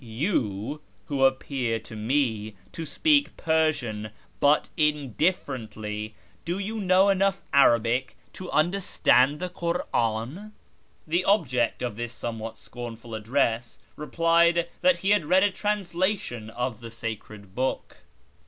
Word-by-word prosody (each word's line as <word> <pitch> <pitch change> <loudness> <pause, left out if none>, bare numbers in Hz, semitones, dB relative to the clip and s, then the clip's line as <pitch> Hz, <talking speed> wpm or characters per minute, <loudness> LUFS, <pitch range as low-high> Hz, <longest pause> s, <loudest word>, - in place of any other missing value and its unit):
You, 115 - -2 0.3
who 135 -2 +3
appear 130 -3 0
to 110 0 -11
me 110 -2 -1 0.2
to 165 -1 -6
speak 290 - +2
Persian 150 -10 0 0.3
but 145 +1 +4
indifferently, 125 - -1 0.3
do 175 +2 -2
you 215 +3 -3
know 190 +1 +4
enough 195 0 +1
Arabic 120 -1 +3 0.2
to 185 - -7
understand 155 -5 +3
the 180 - -3
Kur'an? 170 - -2 0.3
" 110 0 -38
The 170 +4 +1
object 130 - +1
of 120 -4 -3
this 120 0 -4
somewhat 115 -1 -5
scornful 115 -1 -9
address 115 +1 0 0.2
replied 170 +2 +2
that 275 -1 +4
he 195 - +4
had 205 -5 +4
read 185 +5 +4
a 205 - +3
translation 185 - -2
of 125 0 -3
the 115 - -7
sacred 110 -3 -7
book. 130 +4 -2
135 Hz, 125 wpm, -26 LUFS, 115-175 Hz, 0.3 s, but